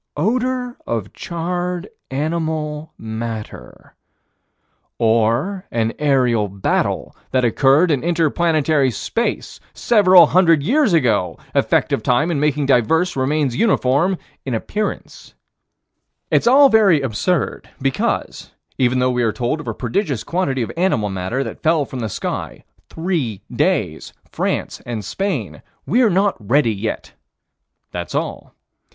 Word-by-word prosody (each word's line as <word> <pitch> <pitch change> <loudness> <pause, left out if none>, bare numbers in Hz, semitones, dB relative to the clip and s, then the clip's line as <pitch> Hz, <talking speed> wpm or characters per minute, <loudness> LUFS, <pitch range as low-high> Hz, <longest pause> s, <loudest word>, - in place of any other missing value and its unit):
"Odor 250 - -1
of 110 -4 -3
charred 175 +1 -3 0.2
animal 155 +1 -3
matter." 110 - -7 1.0
Or 115 - +1
an 115 -1 -1
aerial 125 -7 +2
battle 100 0 -1
that 130 -1 +1
occurred 140 +8 +3
in 140 -3 0
inter 165 -3 +1
planetary 155 -4 +2
space 225 - -3 0.2
several 185 -6 +6
hundred 165 -3 +3
years 265 - +2
ago 115 - +1 0.2
effect - - +1
of - - 0
time 140 +8 +1
in 150 - -1
making 150 -1 +1
diverse 160 +8 +2
remains 135 -1 0
uniform 175 - +2 0.3
in 130 -3 -2
appearance 210 - -5 1.0
It's - - +2
all 275 +3 +7
very 210 - +5
absurd 135 - -1
because, 135 0 -2 0.3
even 130 0 +2
though 125 0 +2
we 125 0 0
are 115 -2 +2
told 125 +6 -2
of 150 - -9
a - - -2
prodigious 130 - -2
quantity 140 -8 -1
of - - -5
animal 165 - 0
matter 95 +8 -2
that - - -8
fell 160 -2 +2
from 130 - -7
the 110 -2 -3
sky - - -5 0.3
three 160 - -2
days - - -1 0.2
France - - -2
and 115 -4 -5
Spain 195 - -3 0.2
we're 245 -2 +3
not 195 +2 +2
ready 120 +2 +2
yet: 105 +2 -5 0.8
that's 85 -2 -5
all. - - -4
145 Hz, 130 wpm, -19 LUFS, 120-180 Hz, 1.0 s, all